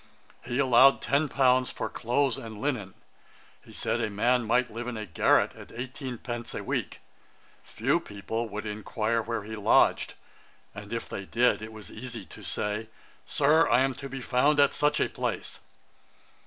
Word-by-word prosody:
He 120 0 -3
allowed 135 0 +6
ten 145 +2 +1
pounds 130 -2 +3
for - - -4
clothes 125 +2 0
and 110 -2 -8
linen. 115 -9 -2 0.7
He - - -15
said - - -1
a - - 0
man 120 +4 +2
might 125 +1 +2
live 120 +2 -5
in 125 -2 -4
a 110 - -4
garret 85 - +3
at - - -13
eighteen 125 +1 -6
pence 120 0 -6
a - - -4
week; - - -3 0.6
few - - 0
people 110 +3 -5
would 105 +1 -5
inquire 110 +2 -1
where 115 -1 -3
he 110 +1 -6
lodged; 105 - +3 0.6
and 105 0 -9
if 115 0 -3
they 100 - -6
did, 120 -1 +2
it 110 +1 -7
was 110 -2 -10
easy 115 -2 -7
to - - -12
say, 105 +2 -3 0.4
'Sir, 155 +3 +4
I 120 +2 +5
am 135 0 +2
to 135 +1 -8
be 135 0 -6
found 135 +4 +2
at 140 -1 +5
such 150 0 +2
a - - +2
place.' - - -4
120 Hz, 175 wpm, -28 LUFS, 110-130 Hz, 0.7 s, allowed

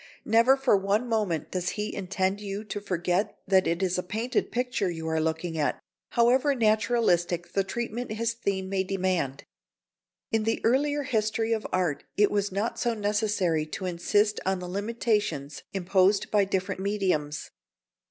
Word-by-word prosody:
Never 230 +5 +5
for 270 -5 +3
one 200 +5 +1
moment 210 -9 -1
does 180 -1 -1
he 210 0 -2
intend 190 +1 -1
you 200 0 -4
to 205 -1 -5
forget 185 +1 -1
that 190 -1 +4
it 170 +3 0
is 185 -1 +1
a - - +1
painted 220 +7 -2
picture 245 -5 0
you 160 -2 -5
are 160 0 +1
looking 160 +1 -2
at, 145 - 0 0.3
however 255 +4 +4
naturalistic 215 -6 +1
the 195 - +2
treatment 235 +3 -4
his 230 +1 -1
theme 200 -5 -2
may 190 0 0
demand. 185 -8 -1 0.9
In 225 - +2
the 225 +1 0
earlier 290 +5 +2
history 225 -1 0
of 220 -1 -2
art 175 -6 0
it 210 0 +4
was 205 -1 0
not 205 +5 -2
so 235 -1 0
necessary 205 -6 0
to 185 +4 -5
insist 205 +4 +1
on 190 0 +1
the 180 0 -6
limitations 210 - -1
imposed 195 +1 +2
by 205 -2 +4
different 190 0 -2
mediums. 185 -8 -1
200 Hz, 160 wpm, -27 LUFS, 180-220 Hz, 0.9 s, Never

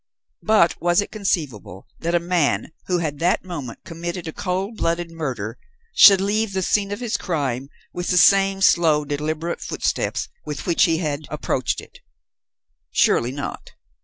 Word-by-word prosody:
But 215 -6 +3
was 175 +1 +3
it 205 - -2
conceivable 140 - -3
that 170 +1 -1
a - - +4
man 170 -3 0 0.2
who 180 - +1
had 150 -4 -3
that 175 +2 +1
moment 145 -10 -7
committed 170 +1 -5
a 160 - -5
cold 190 +4 -3
blooded 170 -1 -1
murder 125 -10 -4 0.3
should 195 -2 +8
leave 205 +1 0
the 190 -1 -1
scene 200 +2 +1
of 205 - -4
his 240 -3 -1
crime 140 -6 -2 0.2
with 175 0 -4
the 180 - +2
same 195 +1 +5
slow, 160 -6 +4
deliberate 155 +3 -3
footsteps - - -2 0.2
with 150 -2 -6
which 170 +1 +3
he 165 -3 +1
had 150 -3 -3
approached 135 -4 -2
it? - - -16 0.9
Surely 120 - +2
not. 140 +1 -7
170 Hz, 160 wpm, -22 LUFS, 150-190 Hz, 0.9 s, should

